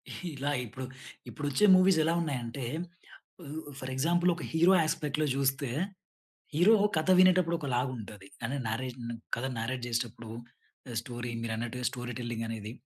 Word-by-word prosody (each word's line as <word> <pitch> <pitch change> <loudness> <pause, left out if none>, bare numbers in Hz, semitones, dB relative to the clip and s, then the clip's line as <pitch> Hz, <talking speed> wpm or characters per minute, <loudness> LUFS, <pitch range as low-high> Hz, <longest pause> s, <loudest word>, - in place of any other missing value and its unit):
ఇలా 145 -5 -3
ఇప్పుడు, 130 +3 -7 0.4
ఇప్పుడొచ్చే 145 +6 +1
మూవీస్ 185 -2 +5
ఎలా 165 +2 +2
ఉన్నాయంటే, 130 -4 -3 0.8
వు 155 0 -6 0.2
ఫర్ 130 0 -5
ఎగ్జాంపుల్ 175 +6 +3
ఒక 175 - -7
హీరో 170 +4 +6
యాస్పెక్ట్‌లో 155 -1 0
జూస్తే, 135 0 +1 0.8
హీరో 180 +9 +6 0.2
కథ 160 +4 0
వినేటప్పుడు 185 -2 +5
ఒకలాగుంటది, 120 -7 -3 0.2
అంటే 130 +5 -1
నారేషను, 120 0 -4 0.2
కథ 125 - -2
నారేట్ 120 +2 -2
జేసేటప్పుడు 115 -1 -3 0.6
ఆహ్, 115 - -3
స్టోరీ 120 0 -5
మీరన్నట్టుగా 115 +2 -3
స్టోరీ 125 0 -5
టెల్లింగ్ 120 -1 -3
అనేది, 110 -1 -5
130 Hz, 130 wpm, -30 LUFS, 120-155 Hz, 0.8 s, హీరో